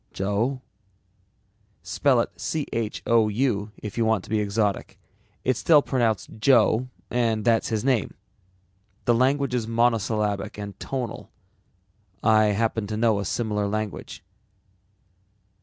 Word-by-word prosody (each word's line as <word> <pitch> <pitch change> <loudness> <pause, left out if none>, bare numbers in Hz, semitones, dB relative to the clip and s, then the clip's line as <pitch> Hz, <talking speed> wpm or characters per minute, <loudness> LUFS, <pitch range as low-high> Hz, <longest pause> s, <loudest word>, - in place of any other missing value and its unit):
"Joe?" 110 +7 -1 1.2
"Spell 130 -5 +2
it - - -4
Chou 115 -4 0
if 105 0 -6
you - - +3
want 110 -4 +1
to - - -13
be 110 - +2
exotic. 105 -1 -1 0.5
It's 130 -1 +1
still 150 -3 +5
pronounced 115 -5 -1
Joe 120 0 +4 0.2
and 115 -3 0
that's 115 -1 +3
his 110 0 -2
name. 125 - +1 0.9
The 120 - +4
language 135 +2 +1
is 120 -3 -1
monosyllabic 110 -4 0
and 100 -1 -6
tonal. 125 -4 -5 0.9
I 110 -1 +5
happen 110 0 0
to 105 0 -3
know 110 -2 +2
a 100 - -3
similar 105 -1 -1
language." 110 -1 -4
110 Hz, 120 wpm, -25 LUFS, 105-120 Hz, 1.2 s, still